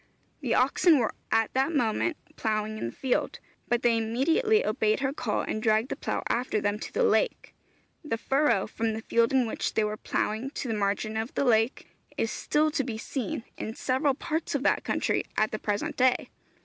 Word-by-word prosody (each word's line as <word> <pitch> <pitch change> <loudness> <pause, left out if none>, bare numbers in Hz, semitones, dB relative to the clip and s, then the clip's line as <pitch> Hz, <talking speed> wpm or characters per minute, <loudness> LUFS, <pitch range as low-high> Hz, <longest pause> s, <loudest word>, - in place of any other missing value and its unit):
The 250 -6 0
oxen 295 +5 +4
were 235 -4 0 0.2
at 225 -1 +2
that 270 +5 +1
moment 245 +6 +1 0.2
ploughing 215 -1 -1
in - - -2
the - - -5
field, 260 - -1 0.3
but 240 0 0
they 235 -1 +4
immediately 325 - +2
obeyed 215 +2 +1
her 270 0 0
call 225 -7 -1
and 215 - -3
dragged 220 +3 +2
the - - -2
plough - - -3
after 240 -2 0
them 205 0 -1
to - - -7
the - - +1
lake. - - +1 0.5
The 265 -7 -2
furrow, 270 -4 +2
from 225 +1 -2
the 220 0 -5
field 230 0 +2
in 260 -2 +3
which 225 - -3
they 220 - +3
were 210 0 -2
ploughing 220 +6 -2
to 270 - -3
the 225 - -1
margin 210 +1 -1
of 225 +3 -4
the - - +1
lake, 225 0 +2 0.3
is - - 0
still 305 +1 +1
to 295 -3 0
be 235 -4 -4
seen 230 -1 -4 0.2
in 220 - -4
several 265 +2 +1
parts 315 +1 -3
of 275 - -1
that - - +2
country - - 0
at 215 0 +2
the 215 - -3
present 205 -1 -2
day. 255 0 +2
235 Hz, 200 wpm, -28 LUFS, 215-270 Hz, 0.5 s, oxen